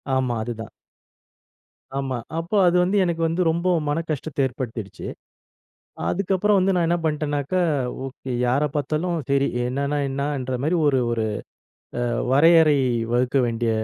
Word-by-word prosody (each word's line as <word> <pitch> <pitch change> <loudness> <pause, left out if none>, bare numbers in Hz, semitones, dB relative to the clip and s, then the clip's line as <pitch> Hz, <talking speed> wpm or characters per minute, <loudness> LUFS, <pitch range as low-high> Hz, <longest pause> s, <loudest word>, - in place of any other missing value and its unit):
ஆமா, 130 -2 0
அதுதான். 115 -2 -6 1.3
ஆமா. 135 -2 -2 0.2
அப்போ, 170 +6 -3
அது 175 - +3
வந்து 190 +3 +1
எனக்கு 170 -2 -1
வந்து 165 +3 -1
ரொம்ப 170 +3 -1 0.2
மன 150 +3 0
கஷ்டத்த 145 -2 -1
ஏற்படுத்திடுச்சு. 125 -2 -5 1.0
அதுக்கப்புறம் 195 +2 +2
வந்து 190 0 +2
நான் 170 -2 +2
என்ன 170 - +2
பண்டேனாக்கா, 150 +2 -1 0.5
ஓகே 130 -1 -7
யார 130 +4 +2
பார்த்தாலும். 155 +5 -1
சரி 140 0 +3 0.2
என்னன்னா 140 +3 -1
என்னன்ற 135 -2 -2
மாரி 170 +3 +2
ஒரு 135 -3 +3
ஒரு 115 -1 0 0.7
அ - - 0 0.3
வரையறை 155 +1 +6 0.3
வகுக்க 125 +2 +1
வேண்டிய 115 0 -1
145 Hz, 130 wpm, -23 LUFS, 130-170 Hz, 1.3 s, வரையறை